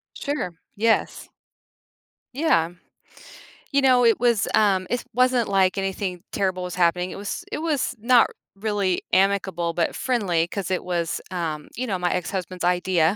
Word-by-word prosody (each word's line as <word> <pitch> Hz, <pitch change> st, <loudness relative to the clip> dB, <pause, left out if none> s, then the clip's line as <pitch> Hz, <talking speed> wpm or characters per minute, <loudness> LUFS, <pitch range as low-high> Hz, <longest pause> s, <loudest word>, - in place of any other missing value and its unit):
Sure. 285 Hz, -10 st, -2 dB, 0.3 s
Yes. 225 Hz, +2 st, 0 dB, 1.1 s
Yeah. 175 Hz, -, +2 dB, 1.0 s
You 280 Hz, 0 st, +3 dB
know, 250 Hz, -2 st, +5 dB
it 230 Hz, -, +4 dB
was, 235 Hz, -4 st, +2 dB
um 195 Hz, -3 st, +3 dB
it 245 Hz, 0 st, -1 dB
wasn't 250 Hz, -2 st, +2 dB
like 195 Hz, 0 st, +2 dB
anything 190 Hz, -2 st, -3 dB
terrible 185 Hz, -2 st, -1 dB
was 180 Hz, -, -5 dB
happening. 180 Hz, +1 st, +1 dB
It -, -, -7 dB
was 200 Hz, 0 st, -5 dB
it -, -, -3 dB
was 300 Hz, -5 st, -1 dB
not 240 Hz, +2 st, +5 dB, 0.3 s
really 200 Hz, -3 st, 0 dB
amicable, 185 Hz, -3 st, +2 dB
but 170 Hz, -1 st, 0 dB
friendly, 190 Hz, -10 st, 0 dB
'cause 190 Hz, 0 st, -4 dB
it 185 Hz, -, 0 dB
was, 170 Hz, -3 st, -2 dB
um, 160 Hz, -4 st, -3 dB
you 255 Hz, +1 st, -3 dB
know, 195 Hz, -, -1 dB
my 175 Hz, 0 st, 0 dB
ex-husband's 185 Hz, 0 st, -4 dB
idea. 180 Hz, -1 st, +2 dB
190 Hz, 150 wpm, -24 LUFS, 180-230 Hz, 1.1 s, know